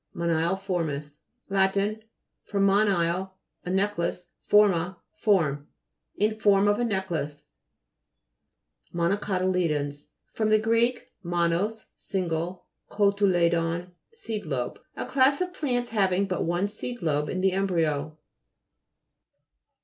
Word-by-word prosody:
MONILEFO'RMIS 165 Hz, -3 st, -1 dB, 0.3 s
lat. 195 Hz, 0 st, +2 dB, 0.7 s
fr. 205 Hz, -, -4 dB
monile, 190 Hz, -2 st, +2 dB, 0.3 s
a 180 Hz, -, -5 dB
necklace, 190 Hz, -2 st, -1 dB
forma, 185 Hz, -4 st, +3 dB, 0.2 s
form. 160 Hz, -, +1 dB, 0.5 s
In 215 Hz, +1 st, +1 dB
form 205 Hz, -1 st, +4 dB
of 205 Hz, +2 st, +2 dB
a -, -, +1 dB
necklace. 180 Hz, -9 st, -2 dB, 1.5 s
MO'XOCOTY'LEDONS 170 Hz, -5 st, 0 dB, 0.2 s
fr. 215 Hz, -1 st, +2 dB
gr. 225 Hz, +2 st, +1 dB, 0.5 s
tnonos, 175 Hz, +5 st, 0 dB
single, 175 Hz, -2 st, -3 dB, 0.2 s
kotuledon, 175 Hz, -4 st, +2 dB, 0.2 s
seed 225 Hz, -, -6 dB
lobe. 125 Hz, -4 st, -3 dB, 0.2 s
A -, -, -3 dB
class 265 Hz, +2 st, +3 dB
of 365 Hz, 0 st, -2 dB
plants 245 Hz, -8 st, -1 dB
having 195 Hz, -3 st, +2 dB
but 185 Hz, -2 st, -2 dB
one 175 Hz, +4 st, 0 dB
seed 220 Hz, +1 st, -6 dB
lobe 150 Hz, -2 st, 0 dB
in 185 Hz, -, -2 dB
the 190 Hz, 0 st, +3 dB
embryo. 160 Hz, -6 st, 0 dB
185 Hz, 100 wpm, -26 LUFS, 170-205 Hz, 1.5 s, form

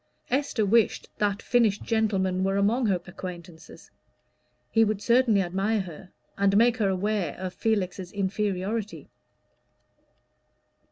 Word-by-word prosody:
Esther 265 Hz, -5 st, 0 dB
wished 225 Hz, +2 st, +2 dB
that 205 Hz, -1 st, 0 dB
finished 225 Hz, -4 st, +2 dB
gentleman 195 Hz, -5 st, 0 dB
were 195 Hz, +1 st, +1 dB
among 225 Hz, +5 st, +2 dB
her 190 Hz, -3 st, +1 dB
acquaintances: 175 Hz, -2 st, -10 dB, 0.8 s
he 225 Hz, -, +4 dB
would 215 Hz, -2 st, 0 dB
certainly 235 Hz, -2 st, +3 dB
admire 195 Hz, +4 st, 0 dB
her, 180 Hz, 0 st, -10 dB, 0.3 s
and 200 Hz, 0 st, +3 dB
make 240 Hz, +2 st, +4 dB
her 205 Hz, -4 st, +1 dB
aware 190 Hz, -3 st, -1 dB
of 185 Hz, 0 st, -5 dB
Felix's 190 Hz, -5 st, -2 dB
inferiority. 200 Hz, +2 st, -3 dB
200 Hz, 115 wpm, -26 LUFS, 185-220 Hz, 0.8 s, he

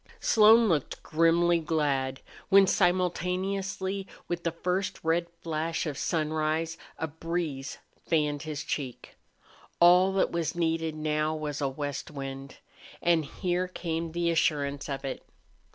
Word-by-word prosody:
IV -, -, -23 dB
Slone 225 Hz, +1 st, +6 dB
looked 155 Hz, -8 st, -1 dB
grimly 165 Hz, +1 st, +3 dB
glad 140 Hz, -5 st, -1 dB, 0.3 s
when 195 Hz, 0 st, +7 dB
simultaneously 190 Hz, +2 st, 0 dB, 0.2 s
with 170 Hz, 0 st, -3 dB
the 170 Hz, -, 0 dB
first 180 Hz, +3 st, -2 dB
red 165 Hz, +1 st, +1 dB, 0.2 s
flash 165 Hz, +1 st, -2 dB
of 150 Hz, -3 st, -3 dB
sunrise 155 Hz, +1 st, -1 dB, 0.2 s
a -, -, -2 dB
breeze 160 Hz, -3 st, -4 dB, 0.3 s
fanned 150 Hz, -3 st, +1 dB
his 150 Hz, -2 st, -5 dB
cheek. 135 Hz, -5 st, -5 dB, 0.6 s
All 180 Hz, +2 st, +6 dB
that 195 Hz, -, +2 dB
was 170 Hz, 0 st, -2 dB
needed 165 Hz, -2 st, 0 dB
now 155 Hz, 0 st, 0 dB
was 150 Hz, -2 st, -4 dB
a 140 Hz, -, +1 dB
west 145 Hz, +1 st, -4 dB
wind. 135 Hz, -1 st, -7 dB, 0.4 s
And 170 Hz, -3 st, +2 dB
here 180 Hz, +4 st, -1 dB
came 165 Hz, -2 st, -3 dB
the 170 Hz, 0 st, +1 dB
assurance 145 Hz, -3 st, 0 dB
of 135 Hz, -1 st, -4 dB
it. 135 Hz, -, -4 dB
165 Hz, 135 wpm, -28 LUFS, 150-175 Hz, 0.6 s, when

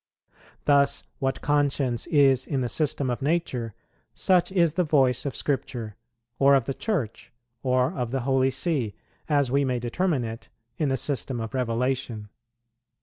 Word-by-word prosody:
Thus, 140 Hz, -1 st, +3 dB, 0.2 s
what 135 Hz, 0 st, -1 dB
conscience 140 Hz, -5 st, +1 dB
is 135 Hz, -4 st, +4 dB
in 135 Hz, -3 st, -1 dB
the 125 Hz, -, -1 dB
system 140 Hz, -3 st, 0 dB
of 120 Hz, -, -3 dB
nature, 135 Hz, -, -1 dB, 0.4 s
such 185 Hz, -1 st, +2 dB
is 170 Hz, -5 st, +3 dB
the 180 Hz, -, +2 dB
voice 135 Hz, -5 st, +2 dB
of 135 Hz, -, -4 dB
Scripture, 120 Hz, -6 st, -3 dB, 0.4 s
or 140 Hz, 0 st, +6 dB
of 130 Hz, -4 st, +2 dB
the 135 Hz, -, -2 dB
Church, 145 Hz, -, -3 dB, 0.3 s
or 130 Hz, -1 st, +1 dB
of 125 Hz, -2 st, -3 dB
the 135 Hz, +1 st, -2 dB
Holy 135 Hz, +1 st, +2 dB
See, 130 Hz, -, -1 dB, 0.3 s
as 140 Hz, -4 st, +2 dB
we 140 Hz, +1 st, +3 dB
may 130 Hz, -2 st, 0 dB
determine 130 Hz, +4 st, 0 dB
it, 115 Hz, 0 st, -7 dB, 0.3 s
in 150 Hz, -, +1 dB
the 135 Hz, -, +1 dB
system 135 Hz, -3 st, -2 dB
of 115 Hz, -1 st, -5 dB
Revelation. 125 Hz, -3 st, -1 dB
135 Hz, 155 wpm, -26 LUFS, 125-145 Hz, 0.4 s, or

